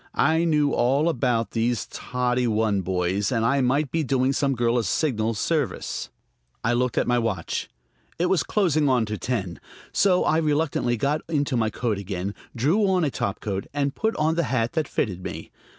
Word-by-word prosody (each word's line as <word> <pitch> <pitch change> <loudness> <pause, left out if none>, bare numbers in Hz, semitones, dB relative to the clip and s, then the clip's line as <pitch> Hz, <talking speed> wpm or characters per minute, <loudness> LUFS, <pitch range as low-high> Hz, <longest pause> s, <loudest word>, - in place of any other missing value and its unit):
I 160 +3 +3
knew 150 -3 +2
all 135 +6 +2
about 120 -8 0
these 115 +1 0
Toddy 125 0 -1
One 110 -3 +1
Boys, 95 +3 -1
and 115 -3 +1
I 140 +4 +2
might 135 +3 +1
be 165 - +1
doing 130 0 +1
some 140 -1 +1
girl 120 0 +2
a - - -1
signal 115 - 0
service. 145 - -2 0.5
I 120 - +2
looked 125 0 0
at - - +3
my 125 0 +2
watch. 105 -8 -2 0.5
It 175 - +1
was 180 -1 +2
closing 155 -8 +1
on 125 -3 +3
to 105 0 -4
ten. 95 -9 -3 0.3
So 185 -2 +3
I 155 - +2
reluctantly 150 -6 0
got 145 +7 0
into 145 -4 0
my 110 -2 +1
coat 110 -1 -2
again, 95 0 -4 0.2
drew 165 - +2
on 185 -2 +2
a 140 - -1
topcoat, 100 -2 -3
and 140 -1 0
put 220 0 -1
on 155 +1 +1
the 170 0 0
hat 120 -2 0
that 160 -3 0
fitted 95 -6 -2
me. - - -7
125 Hz, 185 wpm, -24 LUFS, 110-150 Hz, 0.5 s, I